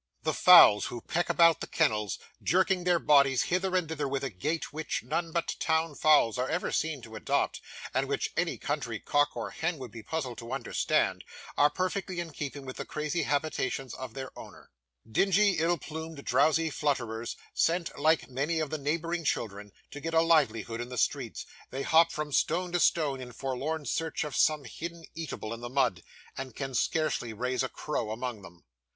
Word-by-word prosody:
The - - 0
fowls 105 0 +8
who 120 - -5
peck 175 +8 -1
about 165 -1 +5
the - - -4
kennels, 105 -3 +1 0.2
jerking 185 0 +2
their 175 -1 +4
bodies 140 -5 +4
hither 185 +1 +1
and 180 -3 +1
thither 150 -2 -2
with 135 0 -2
a 135 - -2
gait 150 - -3
which 155 -5 -3
none 165 +6 -2
but 170 0 -1
town 160 -1 +1
fowls 145 -6 +4
are 130 - 0
ever 175 - -1
seen 155 -5 -1
to 110 -1 -10
adopt, 110 - -1 0.3
and - - +1
which - - -1
any - - 0
country - - -3
cock 145 0 +1
or - - -4
hen 165 +1 -2
would 130 -4 -8
be 115 - -9
puzzled 130 -2 -4
to 120 +1 -7
understand, 135 -3 0 0.3
are 145 - +5
perfectly 185 +2 -2
in 170 -2 -4
keeping 140 -1 -6
with 130 - -7
the - - -3
crazy 150 +3 -2
habitations 140 -2 -1
of 130 -2 -7
their 135 -1 -7
owners. - - -12 0.4
Dingy, 195 - +3
ill 170 +2 +2
plumed, 160 0 -7
drowsy 155 +5 +3
flutterers, 120 -6 -2 0.2
sent, 170 0 +1
like 155 +2 +2
many 140 +6 -1
of 155 -3 -2
the 155 - -2
neighbouring 165 +4 -1
children, 105 -7 -2 0.2
to 145 - -7
get 165 +2 -3
a 160 - +6
livelihood 120 -9 +2
in 120 - -6
the 125 - -6
streets, - - -1 0.2
they 135 +1 -4
hop, 165 +2 +5
from 150 -1 -4
stone 175 +5 +1
to 175 - +1
stone, 145 -5 +2
in 125 -1 -8
forlorn 135 +5 -3
search 160 +1 -1
of 150 -4 -5
some 155 -2 +3
hidden 165 +7 -7
eatable 155 -9 -5
in 115 - -8
the 120 - -5
mud, 125 -9 +1 0.3
and 135 -1 -6
can 135 -1 -4
scarcely 125 -3 0
raise 125 +4 -1
a 130 - -1
crow 150 -7 -3
among 115 0 -4
them. 85 -2 -14
145 Hz, 190 wpm, -29 LUFS, 125-165 Hz, 0.4 s, fowls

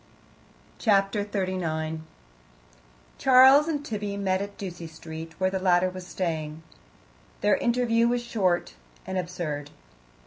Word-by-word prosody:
Chapter 200 -1 +2
39 175 -6 -2 1.2
Charles 265 +3 +7
and 295 -3 -2
Tibby 205 -3 -4
met 190 -1 0
at 200 0 -6
Ducie 175 -4 -6
Street, 160 +1 -9
where 185 0 +1
the 190 - -1
latter 185 0 +3
was 185 -1 -9
staying. 160 -4 -3 0.8
Their 205 - +3
interview 235 -1 +2
was 240 0 0
short 185 - 0 0.3
and 190 - -5
absurd. 160 -5 -4
185 Hz, 115 wpm, -26 LUFS, 165-210 Hz, 1.2 s, Charles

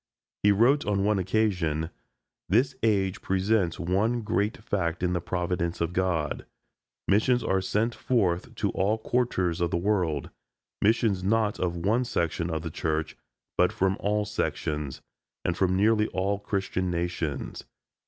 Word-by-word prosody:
He 105 - +5
wrote 125 +8 +4
on 100 -2 0
one 105 -1 +2
occasion: 90 -6 0 0.6
"This 125 +8 +3
age 100 -4 +1
presents 95 -2 +1
one 100 +7 +1
great 105 0 0
fact 90 -6 -2
in 90 0 +1
the 90 - 0
Providence 85 0 -2
of 85 +1 -1
God; 90 -5 -1 0.6
missions 120 +5 +3
are 95 0 +1
sent 105 +5 0
forth 95 -10 0
to - - 0
all 100 +4 +1
quarters 110 -8 0
of 85 - +2
the 85 - 0
world, 90 -6 0 0.5
missions 105 -3 +2
not 110 +1 +1
of 85 -1 -1
one 105 +8 +1
section 85 -7 -1
of 80 -1 -2
the 80 - -4
Church, 80 -1 -2 0.4
but 90 0 +5
from 95 0 +1
all 105 +1 0
sections, 75 -8 -3 0.4
and 90 - +1
from 95 0 +2
nearly 105 +2 +3
all 100 +1 -1
Christian 95 -2 -2
nations. 85 -4 -3
95 Hz, 145 wpm, -27 LUFS, 85-105 Hz, 0.6 s, He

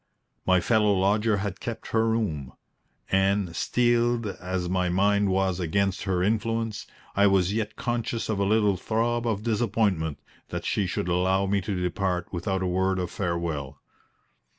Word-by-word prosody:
My 95 0 +5
fellow 105 0 +3
lodger 105 +3 +2
had 100 -1 -4
kept 115 -2 -6
her 115 0 +2
room; 80 - -2 0.6
and, 95 -2 +2
steeled 120 +1 +2
as 95 -3 -3
my 90 0 0
mind 100 +2 +2
was 95 -1 +1
against 95 +3 0
her 90 -2 +1
influence, 115 +1 -1 0.3
I 100 +1 +5
was 95 -1 +3
yet 110 -1 -2
conscious 120 -3 -2
of 110 -3 -1
a - - +2
little 105 -1 +3
throb 115 +4 0
of 105 -2 -1
disappointment 105 -8 0 0.3
that - - -4
she 100 - 0
should 90 - -2
allow 95 +2 +2
me 100 0 +1
to 95 0 -3
depart 90 +1 -2
without 95 +2 -1
a - - -1
word 95 +1 +1
of 90 -1 -3
farewell. 85 -7 -3
100 Hz, 155 wpm, -26 LUFS, 90-110 Hz, 0.6 s, My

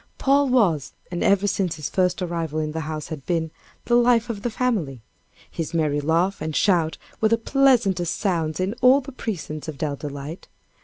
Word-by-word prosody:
Paul 280 0 +3
was, 190 - +2 0.2
and 175 - -2
ever 200 0 +3
since 190 -4 0
his 150 -2 -4
first 180 -1 0
arrival 165 -3 -3
in 155 -1 -1
the 160 - -4
house 155 -1 -5
had 155 -4 -6
been, 165 -3 -1 0.3
"the 240 - 0
life 240 -1 +4
of 205 -3 -7
the 240 - -1
family." 200 - -2 0.5
His 165 +1 -4
merry 150 -3 +1
laugh 165 +6 +1
and 155 -1 -3
shout 170 -5 +2 0.2
were 220 - +4
the 230 - +3
pleasantest 230 - +2
sounds 165 -6 -1
in 185 +3 0
all 260 +3 +6
the 275 +1 -9
precincts 175 - -5
of 155 -3 -6
Dell 145 -1 -2
Delight. 145 +3 -7
175 Hz, 190 wpm, -23 LUFS, 155-225 Hz, 0.5 s, all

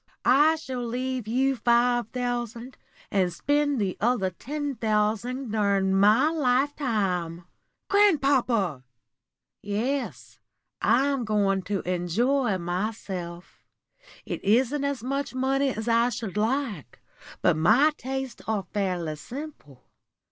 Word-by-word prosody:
I 295 +5 +5
shall 260 -6 -5
leave 250 0 -3
you 265 +4 +1
five 240 -1 +2
thousand, 245 0 -4 0.4
and 185 -3 +1
spend 290 +8 0
the 195 -3 -1
other 215 -5 +1
ten 290 - -4
thousand 225 +2 -1
during 200 -3 +1
my 215 +10 +4
lifetime." 245 - 0 0.4
"Grandpapa!" 265 - +2 0.8
"Yes, 205 - -3 0.4
I'm 275 0 +2
going 200 -3 +1
to 200 -2 0
enjoy 200 +7 0
myself. 180 -1 -5 0.6
It - - -5
isn't 255 +7 +2
as 280 -4 -2
much 275 +1 -3
money 270 +2 +1
as 220 -2 -4
I 235 +1 +3
should 220 -6 -5
like, 220 - -2 0.4
but - - +4
my 230 - +4
tastes 265 -2 -5
are 215 -3 0
fairly 180 -6 -1
simple. 240 - -9
235 Hz, 110 wpm, -26 LUFS, 195-265 Hz, 0.8 s, I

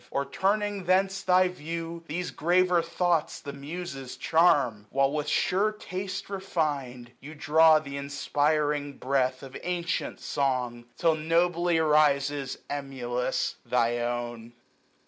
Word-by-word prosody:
Or, 140 - -1
turning 205 +1 -1
thence 190 +2 +2
thy 185 -1 +4
view, 165 -1 -6
these 175 +4 -3
graver 180 +2 +3
thoughts 170 -1 0
The 140 - -7
Muses 140 -2 -7
charm: 140 -11 +3
While, 135 0 +2
with 150 0 -2
sure 200 +7 +2
taste 195 -2 -5
refin'd, 145 -11 -3
930 140 - -10
You 155 - -9
draw 155 +1 +5
th* 140 -2 -8
inspiring 145 +1 0
breath 130 0 0
of 135 -1 -10
antient 175 -1 -2
song; 125 -4 -1
Till 165 -1 +3
nobly 170 +2 +1
rises, 145 -3 +2
emulous, 130 -3 -2
thy 120 -1 +1
own. 120 -1 -4
150 Hz, 125 wpm, -27 LUFS, 135-175 Hz, -, draw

